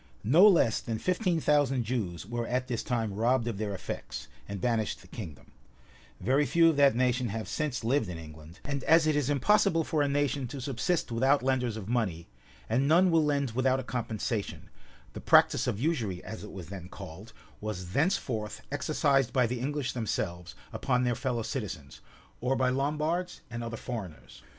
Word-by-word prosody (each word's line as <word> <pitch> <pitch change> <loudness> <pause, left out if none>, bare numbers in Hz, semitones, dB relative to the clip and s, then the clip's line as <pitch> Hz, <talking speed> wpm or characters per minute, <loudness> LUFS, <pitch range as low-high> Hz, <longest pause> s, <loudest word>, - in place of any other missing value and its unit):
No 160 - +7
less 165 - +4
than 115 -1 -3
fifteen 180 - 0
thousand 145 -4 +2
Jews 105 -8 -3
were 120 +2 -3
at 125 +1 -1
this 120 -3 -2
time 115 -4 -1
robbed 120 +3 +1
of 110 -4 -3
their 105 -2 -2
effects, 95 - -6 0.2
and 100 -1 -5
banished 115 -1 -1
the - - -16
kingdom: 90 - -9 0.7
very 130 +9 +2
few 165 -1 +5
of - - -4
that 140 -3 +5
nation 125 0 +1
have 110 +1 -4
since 145 -6 -2
lived 120 -3 +1
in 85 - -5
England: 80 +1 -12
and 140 -2 -3
as 165 0 +5
it 155 -1 +2
is 145 -2 +1
impossible 165 +4 +3
for 155 -1 0
a 145 - +2
nation 140 -2 0
to 135 +3 -7
subsist 135 +4 -1
without 130 +4 +3
lenders 125 -4 0
of 105 -3 -7
money, 105 -9 -1 0.4
and 130 +5 +1
none 175 +4 +5
will 165 -1 +4
lend 140 -4 0
without 130 +2 +2
a - - -4
compensation, 115 -3 -3 0.4
the - - -7
practice - - +4
of 100 - -1
usury, 115 - -1
as 110 - -7
it 105 - -9
was 90 -4 -9
then 90 -2 -8
called, 95 +4 -10 0.3
was 95 -4 -5
thenceforth 115 - -1
exercised 140 -4 +1
by 125 -2 +3
the 120 +1 -2
English 140 +1 -2
themselves 90 -7 -3 0.2
upon 125 -2 +1
their 125 -1 +2
fellow 120 -1 -2
citizens, 105 - -5 0.4
or 130 +2 0
by 130 -1 +2
Lombards 155 +6 -1
and 120 0 -4
other 115 0 -5
foreigners. 105 -12 -7
125 Hz, 185 wpm, -29 LUFS, 110-145 Hz, 0.7 s, No